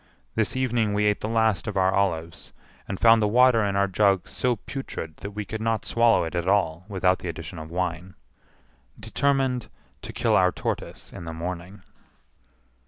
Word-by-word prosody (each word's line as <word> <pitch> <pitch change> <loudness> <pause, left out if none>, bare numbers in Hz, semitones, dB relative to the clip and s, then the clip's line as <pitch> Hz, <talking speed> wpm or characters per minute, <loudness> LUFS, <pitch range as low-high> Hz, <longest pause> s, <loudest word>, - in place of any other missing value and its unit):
This 110 +1 0
evening 120 -5 0
we 105 0 +2
ate 105 0 +2
the - - -2
last 110 -4 +1
of 105 - -3
our 95 0 +3
olives, 85 -4 -2 0.3
and 95 - -4
found 115 -1 +6
the 105 - +3
water 120 0 +5
in 100 -1 -1
our 100 0 +3
jug 95 -1 +2
so 125 -1 0
putrid 100 - -7
that 100 - -7
we 105 0 -5
could 110 +2 -5
not 115 0 -1
swallow 115 0 +3
it 80 - -5
at 85 0 -2
all 90 -4 +1
without 95 -2 +1
the - - -6
addition 80 +2 -7
of 80 0 -8
wine. 90 +1 -3 0.8
Determined 135 -3 0 0.3
to - - -7
kill - - +1
our 90 0 +4
tortoise - - -5
in 85 - -8
the 80 - -5
morning. 90 +4 -6
100 Hz, 180 wpm, -25 LUFS, 90-110 Hz, 0.8 s, found